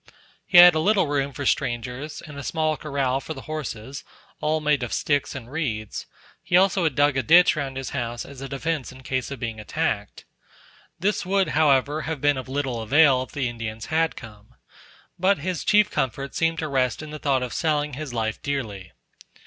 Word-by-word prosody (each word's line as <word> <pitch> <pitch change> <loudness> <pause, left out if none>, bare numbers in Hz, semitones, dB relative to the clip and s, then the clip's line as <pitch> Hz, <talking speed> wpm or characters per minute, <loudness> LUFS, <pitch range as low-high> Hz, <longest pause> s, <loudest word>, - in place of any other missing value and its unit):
He 180 - +4
had 175 0 +11
a 160 - 0
little 200 +4 +3
room 140 -1 -1
for 140 +1 -6
strangers, 125 +5 -2
and 150 - -10
a 140 - -6
small 155 +2 0
corral 140 -3 -1
for 160 +3 -6
the 135 - -8
horses, 140 -4 -6 0.4
all 155 +1 0
made 150 -2 +1
of 120 - -3
sticks 145 -2 0
and 125 -2 -8
reeds; 115 -9 -3 0.3
he - - -1
had 180 - +8
also 190 -3 +2
dug 145 0 +2
a - - +2
ditch 175 +8 +6
round 135 -3 -4
his 135 - -5
house 120 0 -3
as 135 -1 -11
a 135 - -6
defence 145 -1 -3
in 130 +1 -14
case 130 -1 -2
of 140 - -6
being 115 -3 -4
attacked. 105 - -3 0.7
This 205 +4 0
would, 195 +1 +1
however, 145 0 +2
have 155 0 -4
been 145 0 +2
of 130 0 -6
little 130 -4 -2
avail, 135 +2 +4
if 130 - -7
the 140 -4 -1
Indians 115 -2 -5
had 160 0 +2
come; 105 -3 -13 0.6
but 190 +3 +3
his 175 +2 -3
chief 210 +1 +4
comfort 135 +2 -2
seemed 165 0 0
to 160 - -2
rest 130 -1 0
in 155 - -8
the 150 - -7
thought 135 -3 +1
of 125 - -5
selling 150 -2 0
his 145 0 -5
life 110 -2 -2
dearly. 110 -10 -4
140 Hz, 200 wpm, -24 LUFS, 125-155 Hz, 0.7 s, had